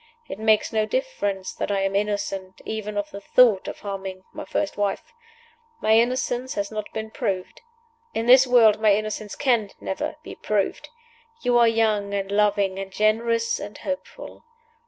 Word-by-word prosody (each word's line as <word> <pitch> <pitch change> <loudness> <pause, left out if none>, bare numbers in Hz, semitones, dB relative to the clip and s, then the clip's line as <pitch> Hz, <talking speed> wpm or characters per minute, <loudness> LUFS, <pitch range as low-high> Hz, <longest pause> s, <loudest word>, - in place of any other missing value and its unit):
It 195 - -7
makes 220 +1 +2
no 215 -1 +1
difference 205 - -2
that - - -4
I 200 -1 0
am 195 0 -1
innocent 200 -2 -2
even 210 -1 -4
of 205 0 -3
the 200 - -8
thought 220 -2 +4
of - - -7
harming 195 -2 -6
my - - -7
first 195 - -2
wife. 205 - -2 0.7
My 220 - +2
innocence 250 +2 +1
has 200 0 -2
not 215 -1 -5
been 220 0 -5
proved. 185 -3 -3 0.5
In 225 - -1
this 255 +2 +7
world 225 -4 +5
my 210 -2 +5
innocence 215 0 -4
can 240 -7 +1
never 190 - -4
be - - -8
proved. 205 -2 -2 0.5
You 245 - +2
are 235 - +6
young 215 -3 +1
and 195 0 -3
loving, 200 -2 +2
and 195 0 -6
generous 230 +3 +1
and 205 0 -8
hopeful. 280 -1 -7
210 Hz, 165 wpm, -24 LUFS, 200-230 Hz, 0.7 s, this